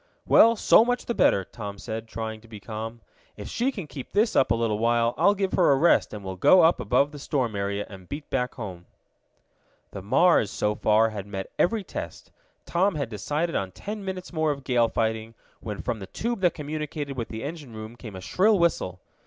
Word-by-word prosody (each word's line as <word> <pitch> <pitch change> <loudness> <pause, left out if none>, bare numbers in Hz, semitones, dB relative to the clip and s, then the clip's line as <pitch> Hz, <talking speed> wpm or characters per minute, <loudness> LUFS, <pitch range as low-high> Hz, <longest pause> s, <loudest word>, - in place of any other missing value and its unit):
"Well, 230 +1 +6
so 220 - +6
much 245 +1 -1
the 235 - -1
better," 100 - +3
Tom 100 -2 -8
said, 110 +2 -6
trying 110 -1 -5
to 115 - -17
be 110 -2 -10
calm. 115 +2 -6 0.4
"If - - -7
she 250 +3 0
can 195 -10 -6
keep 140 -3 -9
this 215 +3 +2
up - - +4
a - - +3
little 115 -2 0
while 115 +1 +2
I'll 190 +8 +4
give 195 -1 -1
her 175 -5 +4
a - - +5
rest 165 +6 +3
and 105 -1 -7
we'll 95 -1 -5
go 180 - +6
up 165 +2 +4
above 145 +1 +2
the 145 - -9
storm 130 -6 -1
area, 100 +1 -2
and 95 -3 -13
beat 145 +1 -6
back 125 -1 -1
home." 95 -7 -8 1.0
The 100 - -7
Mars, 130 - +4
so 105 0 0
far, 110 +1 +3
had 100 -2 -6
met 95 -2 -6
every 215 +3 +2
test. - - -7 0.3
Tom 185 +2 +1
had 140 -5 -2
decided 150 - -2
on 95 -1 -1
ten 210 0 -6
minutes 185 -2 -6
more 155 -1 +1
of 140 -2 -3
gale 120 -3 +2
fighting, 110 0 -2 0.2
when 105 -3 -6
from 120 -3 -2
the 95 - -8
tube 235 - -3
that 180 -3 +2
communicated 150 -1 -4
with 115 -3 -3
the 110 0 -6
engine 145 -5 -7
room 110 +2 -8
came 110 -4 -10
a 95 - -7
shrill 205 - +3
whistle. 95 - 0
120 Hz, 215 wpm, -26 LUFS, 110-170 Hz, 1.0 s, Well